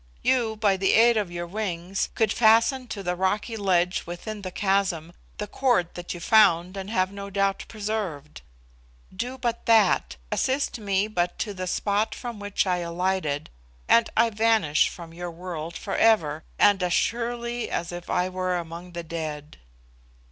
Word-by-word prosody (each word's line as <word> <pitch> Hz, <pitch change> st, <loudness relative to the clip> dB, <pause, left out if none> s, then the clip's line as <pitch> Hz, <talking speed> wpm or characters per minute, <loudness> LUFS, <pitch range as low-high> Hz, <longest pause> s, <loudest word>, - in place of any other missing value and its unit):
You, 235 Hz, -4 st, +2 dB
by 205 Hz, -3 st, +2 dB
the 195 Hz, 0 st, +2 dB
aid 235 Hz, +1 st, +6 dB
of 210 Hz, -4 st, 0 dB
your 175 Hz, 0 st, -5 dB
wings, 185 Hz, -1 st, -3 dB
could 220 Hz, -3 st, +2 dB
fasten 230 Hz, +3 st, +4 dB
to 205 Hz, -3 st, -6 dB
the 180 Hz, -1 st, -1 dB
rocky 205 Hz, +5 st, -1 dB
ledge 180 Hz, -4 st, +1 dB
within 205 Hz, +5 st, -6 dB
the 185 Hz, -, -5 dB
chasm 185 Hz, -4 st, 0 dB, 0.2 s
the 210 Hz, -, -3 dB
cord 210 Hz, -6 st, +1 dB
that 175 Hz, 0 st, -7 dB
you -, -, -7 dB
found, 180 Hz, -2 st, +4 dB
and 195 Hz, 0 st, -6 dB
have 185 Hz, -3 st, +1 dB
no 200 Hz, 0 st, -7 dB
doubt 195 Hz, 0 st, 0 dB
preserved. 200 Hz, -9 st, -4 dB, 0.7 s
Do 245 Hz, +6 st, -4 dB
but 235 Hz, -2 st, -3 dB
that; 200 Hz, -, +4 dB, 0.2 s
assist 265 Hz, -2 st, 0 dB
me 200 Hz, -1 st, 0 dB
but 180 Hz, -4 st, -1 dB
to 205 Hz, -, -3 dB
the 185 Hz, -1 st, -5 dB
spot 205 Hz, +3 st, 0 dB
from 240 Hz, -4 st, -6 dB
which 205 Hz, 0 st, -1 dB
I 180 Hz, -1 st, +1 dB
alighted, 170 Hz, -3 st, -2 dB, 0.4 s
and 230 Hz, -1 st, +5 dB
I 230 Hz, +1 st, +4 dB
vanish 215 Hz, -8 st, +3 dB
from 165 Hz, -2 st, -10 dB
your 175 Hz, +1 st, -5 dB
world 170 Hz, -1 st, -6 dB
for 195 Hz, -, -4 dB
ever, 160 Hz, -9 st, +3 dB
and 205 Hz, -2 st, +4 dB
as 180 Hz, -1 st, +1 dB
surely 235 Hz, +2 st, -1 dB
as 170 Hz, 0 st, -3 dB
if 175 Hz, 0 st, -8 dB
I 180 Hz, 0 st, +1 dB
were 185 Hz, -1 st, -1 dB
among 170 Hz, +1 st, -7 dB
the 170 Hz, 0 st, -5 dB
dead." 155 Hz, -3 st, -6 dB
195 Hz, 170 wpm, -25 LUFS, 175-220 Hz, 0.7 s, aid